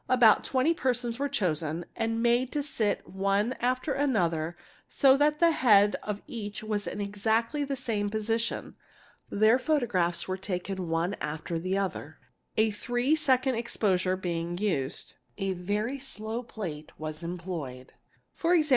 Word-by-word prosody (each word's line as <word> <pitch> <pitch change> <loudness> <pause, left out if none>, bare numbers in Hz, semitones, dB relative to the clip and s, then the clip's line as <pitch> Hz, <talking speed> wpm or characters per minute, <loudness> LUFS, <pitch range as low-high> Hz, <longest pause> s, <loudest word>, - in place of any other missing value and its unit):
About 245 -4 +6
twenty 270 +5 +2
persons 245 -5 -1
were 285 0 0
chosen 165 - -1
and 225 0 -1
made 240 +2 +3
to 295 -1 0
sit 220 -7 -1
one 195 +5 +1
after 255 +3 0
another 175 - 0 0.3
so 270 -2 +5
that 295 +2 +3
the 335 -1 +6
head 210 -8 +5
of 210 -1 -4
each 210 -2 -6
was 210 -1 -2
in - - -4
exactly 220 +7 0
the 275 -1 -2
same 225 -6 -1
position. 225 +2 -2 0.5
Their 215 +4 +4
photographs 220 - +1
were 185 0 -2
taken 190 -1 -3
one 165 +4 0
after 160 +2 -3
the 185 +3 -1
other, 180 -6 -3 0.4
a 220 0 +4
three 245 +7 +1
seconds 260 -5 +2
exposure 185 -5 +1
being 175 -1 -3
used. 165 -9 -1 0.2
A 195 -1 -1
very 210 +9 -2
slow 225 -3 -3
plate 175 -11 -7
was 155 0 -5
employed, 170 -7 -6 0.5
2.e. 340 -1 +4
210 Hz, 145 wpm, -29 LUFS, 180-250 Hz, 0.5 s, About